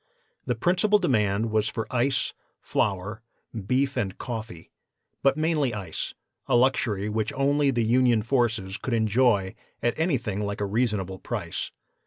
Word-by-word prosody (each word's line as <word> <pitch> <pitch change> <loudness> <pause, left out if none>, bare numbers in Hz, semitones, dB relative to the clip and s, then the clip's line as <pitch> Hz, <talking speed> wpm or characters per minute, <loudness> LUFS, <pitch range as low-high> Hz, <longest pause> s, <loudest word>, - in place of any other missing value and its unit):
The - - +1
principal 190 +4 +3
demand 110 - +1
was 110 0 +2
for 110 -2 -3
ice, 125 +1 +1 0.3
flour, 105 +2 -1 0.5
beef 135 +3 +1
and 105 -6 -2
coffee, 110 -8 -6 0.5
but 135 +1 +3
mainly 155 -6 +1
ice, 95 -6 -5 0.3
a - - +3
luxury 120 -5 +2
which 105 0 -1
only 140 +1 +2
the 120 -3 +1
Union 120 -1 +3
forces 115 -5 0
could 125 -2 -2
enjoy 110 -3 +2 0.3
at 120 0 +2
anything 125 - 0
like 100 0 -3
a 105 - 0
reasonable 100 -4 -1
price. - - -4
115 Hz, 140 wpm, -26 LUFS, 105-130 Hz, 0.5 s, principal